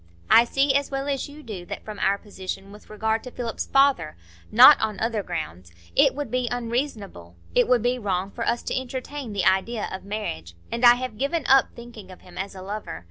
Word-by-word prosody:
I 235 Hz, -, +8 dB
see 275 Hz, +3 st, +1 dB
as 280 Hz, 0 st, +1 dB
well 270 Hz, 0 st, -3 dB
as 280 Hz, 0 st, -2 dB
you 300 Hz, +1 st, -12 dB
do 205 Hz, -8 st, -7 dB
that -, -, -7 dB
from 210 Hz, -2 st, -8 dB
our 200 Hz, +1 st, +2 dB
position 195 Hz, -1 st, -7 dB
with 210 Hz, +1 st, -15 dB
regard 220 Hz, +1 st, -1 dB
to 250 Hz, -, -7 dB
Philip's 240 Hz, -2 st, -5 dB
father—not 195 Hz, -, +4 dB
on 215 Hz, -2 st, -2 dB
other 225 Hz, -1 st, -1 dB
grounds—it 85 Hz, -, -2 dB
would 290 Hz, 0 st, -5 dB
be 250 Hz, -1 st, 0 dB
unreasonable, 230 Hz, -, -4 dB, 0.2 s
it -, -, +3 dB
would 250 Hz, -3 st, +3 dB
be 250 Hz, +1 st, +1 dB
wrong, 195 Hz, -2 st, -2 dB
for 230 Hz, -, -5 dB
us 235 Hz, -, 0 dB
to -, -, -3 dB
entertain 260 Hz, 0 st, -5 dB
the 200 Hz, -3 st, -1 dB
idea 210 Hz, +4 st, +1 dB
of 190 Hz, -, -6 dB
marriage; 85 Hz, -, -5 dB, 0.2 s
and 235 Hz, +1 st, -3 dB
I 240 Hz, 0 st, +9 dB
have 245 Hz, -3 st, -6 dB
given 285 Hz, +4 st, -1 dB
up 270 Hz, 0 st, +4 dB
thinking 235 Hz, -5 st, -11 dB
of 185 Hz, -, -13 dB
him 180 Hz, -, -16 dB
as 195 Hz, +1 st, -5 dB
a 185 Hz, -, -9 dB
lover. 200 Hz, -, -6 dB
220 Hz, 205 wpm, -24 LUFS, 190-255 Hz, 0.2 s, I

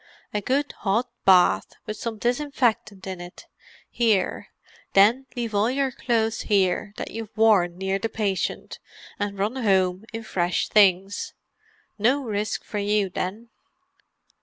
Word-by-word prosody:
A 210 Hz, -, -1 dB
good 280 Hz, +7 st, 0 dB
hot 225 Hz, +5 st, 0 dB
bath, 185 Hz, -2 st, +4 dB
with 215 Hz, -, -4 dB
some 220 Hz, +1 st, -5 dB
disinfectant 240 Hz, -5 st, -1 dB
in 190 Hz, -2 st, -6 dB
it, 175 Hz, 0 st, -11 dB, 0.4 s
here; 220 Hz, -5 st, 0 dB, 0.5 s
then 225 Hz, +7 st, +5 dB
leave 235 Hz, -3 st, -3 dB
all 205 Hz, +3 st, +2 dB
your 270 Hz, +1 st, 0 dB
clothes 225 Hz, -3 st, 0 dB
here 200 Hz, 0 st, +1 dB
that -, -, -5 dB
you've 225 Hz, -1 st, -8 dB
worn 195 Hz, -6 st, +4 dB
near 190 Hz, +1 st, -1 dB
the 225 Hz, -, -2 dB
patient, 200 Hz, -4 st, -2 dB, 0.4 s
and 205 Hz, -1 st, -3 dB
run 210 Hz, +6 st, -1 dB
home 190 Hz, -4 st, +1 dB
in 225 Hz, 0 st, -6 dB
fresh 180 Hz, -4 st, -1 dB
things. 195 Hz, -1 st, +3 dB, 0.6 s
No 260 Hz, +7 st, +2 dB
risk 210 Hz, -3 st, -2 dB
for 210 Hz, -, -4 dB
you 205 Hz, -1 st, +1 dB
then." 210 Hz, +7 st, -4 dB
210 Hz, 135 wpm, -24 LUFS, 195-230 Hz, 0.6 s, then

